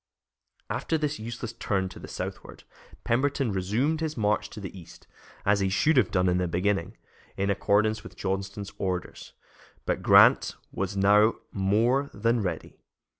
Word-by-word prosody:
After 160 - -1
this 150 0 -2
useless 115 +1 -6
turn 100 -4 -1
to - - -11
the - - -9
southward - - -7 0.4
Pemberton 130 0 +1
resumed 110 - 0
his 155 -3 -3
march 105 -1 0
to 110 - -9
the 100 -1 -8
east, 90 -4 -13 0.4
as 100 0 +3
he 95 -1 +1
should 150 +11 +2
have 130 - +4
done 90 -1 +1
in 90 0 +2
the 90 - 0
beginning, 90 +1 -1 0.4
in 100 +1 +1
accordance 110 +2 +1
with - - -11
Johnston's 100 +1 -4
orders; 90 -2 -4 0.5
but - - -1
Grant - - +6 0.2
was 95 +1 -3
now 105 +3 +5 0.2
more 115 +8 +1
than 115 0 +1
ready. 95 - -5
105 Hz, 155 wpm, -27 LUFS, 95-115 Hz, 0.5 s, Grant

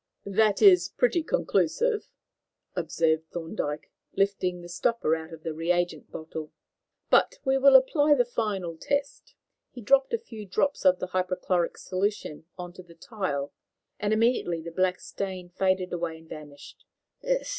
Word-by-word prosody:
"That 205 +1 +2
is 380 -3 +7
pretty 435 -9 +1
conclusive," 470 +3 0 0.7
observed 160 -1 0
Thorndyke, 160 -3 -4 0.2
lifting 190 -3 0
the 175 - -10
stopper 175 -1 0
out 160 +1 -8
of 160 -1 -11
the 160 - -3
reagent 175 0 -1
bottle, 160 -1 -7 0.6
"but - - +4
we 265 0 +3
will 275 0 +7
apply 290 +3 +5
the 245 -3 +3
final 200 -8 -2
test." 285 - -3 0.3
He 250 - -11
dropped 270 +4 +3
a 465 - +1
few 230 - -10
drops 280 +9 0
of 185 -1 +6
the 185 - -5
hypochlorite 185 -1 -1
solution 185 -5 -3
on 175 -1 -7
to 185 - -11
the 170 -2 -17
tile, 165 -8 -4 0.5
and 205 0 -1
immediately 220 -6 +2
the 170 +1 -7
black 185 +1 +1
stain 185 -2 -6
faded 185 0 0
away 170 -2 -3
and 160 0 -17
vanished. 145 -2 -11
185 Hz, 145 wpm, -27 LUFS, 165-240 Hz, 0.7 s, is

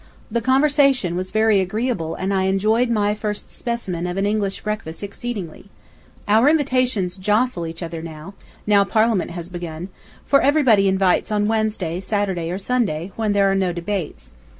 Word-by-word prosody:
The 235 +1 0
conversation 270 - +3
was 185 +1 -3
very 220 -1 +3
agreeable 190 -3 -2
and 190 +1 -2
I 190 -1 +1
enjoyed 215 +6 +2
my 210 -2 +1
first 210 -1 -5
specimen 190 -8 -3
of 180 +1 -4
an 195 - +1
English 205 -2 -1
breakfast 210 -5 -5
exceedingly.... 200 -3 -6 0.6
Our 220 +7 +5
invitations 255 - +1
jostle 210 -2 0
each 165 +2 -6
other, 165 -1 -5
now 195 +5 -2
Parliament 215 -1 +1
has 175 0 -7
begun, 175 0 -6 0.4
for 275 - +4
everybody 265 -9 +4
invites 190 +1 +2
on 210 -1 +1
Wednesday, 215 -6 -1
Saturday, 190 -4 -2
or 180 - -2
Sunday, 195 -6 -1
when 220 -2 0
there 200 -1 +3
are - - +2
no 190 -2 +1
debates. 175 - -5
200 Hz, 155 wpm, -21 LUFS, 180-225 Hz, 0.6 s, Our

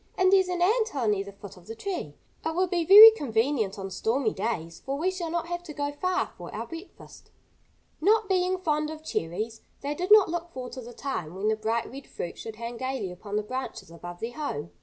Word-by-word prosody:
"And 370 +1 +4
there's 380 -1 +5
an 355 -1 0
ant 445 +4 +3
hill 260 -6 -2
near 205 -2 +1
the 200 - -9
foot 200 -1 -12
of 180 - -17
the 225 - -6
tree. 380 - -5 0.3
It 320 0 -2
will 370 +2 +3
be 350 -2 0
very 420 +6 +12
convenient 230 - 0
on 195 -1 -6
stormy 225 +4 0
days, 190 -6 -3
for 275 +1 -3
we 355 +5 +1
shall 360 -3 -4
not 340 0 -1
have 345 +1 -4
to 305 -4 -8
go 285 -1 -2
far 365 +5 -1
for - - -8
our - - -4
breakfast." 330 +3 -12 0.7
Not 430 +4 +4
being 370 -1 +1
fond 305 -4 0
of 310 0 -8
cherries, 220 - -3 0.2
they 285 +1 -2
did 360 +6 -4
not 425 -2 +8
look 345 0 -4
forward 255 -1 -6
to 260 - -6
the 240 0 -10
time 180 - -4
when 200 +3 0
the 220 - +2
bright 225 +2 -1
red 270 +1 -10
fruit 170 - -6
should 225 -1 -7
hang 235 +1 -6
gaily 260 -6 -3
upon 200 +3 -7
the 210 - +1
branches 255 -6 -6
above 175 +1 -9
their 235 +2 -4
home. 170 - -4
270 Hz, 230 wpm, -27 LUFS, 215-350 Hz, 0.7 s, very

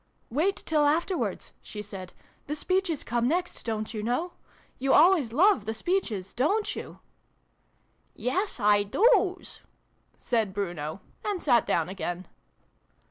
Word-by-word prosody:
" - - -41
Wait 330 +10 +2
till 300 -2 +1
afterwards," 340 +5 -1
she 210 -1 -7
said. 190 -3 -8 0.2
" - - -35
The 300 - -2
speeches 370 -1 0
come 240 +1 0
next, 350 +5 -1
don't 220 0 -3
you 215 - -3
know? 250 +11 -1 0.5
You 270 +1 +2
always 320 -7 +5
love 350 - +4
the 220 +1 -3
speeches, 220 - -1
dorit 405 - +1
you? - - -7 0.4
" - - -43
" - - -42 0.2
Yes, 380 -3 -1
I 205 -1 +4
doos," 380 - +2 0.6
said 220 -5 -1
Bruno: 175 -4 -3 0.2
and 410 -3 -1
sat 240 -6 +4
down 165 -1 +1
again. 185 -1 -4
250 Hz, 145 wpm, -27 LUFS, -, 0.6 s, always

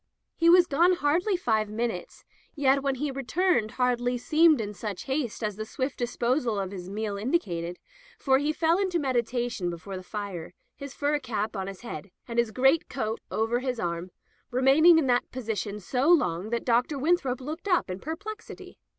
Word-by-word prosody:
He 335 0 +4
was 355 0 +7
gone 340 +4 +3
hardly 355 +5 +1
five 220 - 0
minutes, 235 - -4 0.3
yet 275 -2 +3
when 275 -1 0
he 285 +2 -2
returned 275 - 0
hardly 245 -1 +1
seemed 310 +3 +4
in 210 -2 -3
such 205 -2 -5
haste 265 -5 -2
as 210 -2 -2
the 215 - -3
swift 260 +5 -4
disposal 240 -1 0
of 195 -1 -3
his 185 -2 -7
meal 205 0 -3
indicated, 180 - -1 0.4
for 265 -1 +3
he 295 +2 +1
fell 330 +3 +2
into 375 -3 +1
meditation 245 - -1
before 175 +3 -6
the - - -7
fire, 185 -3 -6 0.2
his 280 -1 -9
fur 290 +1 0
cap 220 -5 -3
on 190 -1 -3
his 195 -1 -8
head, 230 -4 -7 0.2
and 235 -1 -1
his 235 -1 +2
great 265 +7 +2
coat 225 -4 -3
over 225 +2 0
his 255 -2 -3
arm, 170 0 -3 0.4
remaining 275 +7 +6
in 320 - +3
that 245 -1 +1
position 215 -4 -3
so 255 - 0
long 205 - +3
that 235 0 -2
Dr. 250 +4 +2
Winthrop 275 -4 +1
looked 305 +8 -6
up 360 -3 +2
in 185 +1 -5
perplexity. 405 - -8
250 Hz, 180 wpm, -27 LUFS, 215-295 Hz, 0.4 s, was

